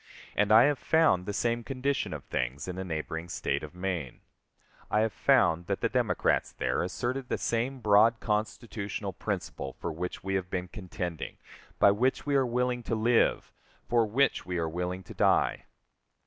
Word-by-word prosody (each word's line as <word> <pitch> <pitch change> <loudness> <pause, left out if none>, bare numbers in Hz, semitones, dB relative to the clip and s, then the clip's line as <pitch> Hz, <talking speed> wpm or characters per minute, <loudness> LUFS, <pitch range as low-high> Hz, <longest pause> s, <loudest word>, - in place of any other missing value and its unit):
And 105 +1 +2
I 110 +2 +9
have 145 0 +2
found 160 - +3
the - - -1
same 115 +3 0
condition 135 +2 -1
of - - -6
things 65 +5 -3
in 90 - -4
the 95 - -4
neighboring 80 0 -4
State - - -1
of 75 +2 -9
Maine. 90 -7 -4 0.7
I 105 - +2
have 110 -2 0
found 85 -1 +3
that - - -2
the - - +1
Democrats - - +1
there - - -1
asserted 125 +9 -3
the - - 0
same 125 +3 -1
broad 110 +2 +5
constitutional 105 -2 -3
principle 65 - -4
for 85 - -5
which 90 +3 -5
we 95 +1 -2
have 95 -2 -1
been 90 -1 -3
contending, 90 -4 -5 0.4
by 100 - +6
which 125 +6 0
we 145 -1 +1
are 135 -2 +3
willing 125 0 0
to 115 - -2
live, 115 +2 +2 0.3
for 120 -1 +3
which 135 +6 +2
we 90 -1 -3
are 85 -1 0
willing 90 +3 -3
to - - -11
die! - - +2
105 Hz, 175 wpm, -29 LUFS, 90-120 Hz, 0.7 s, I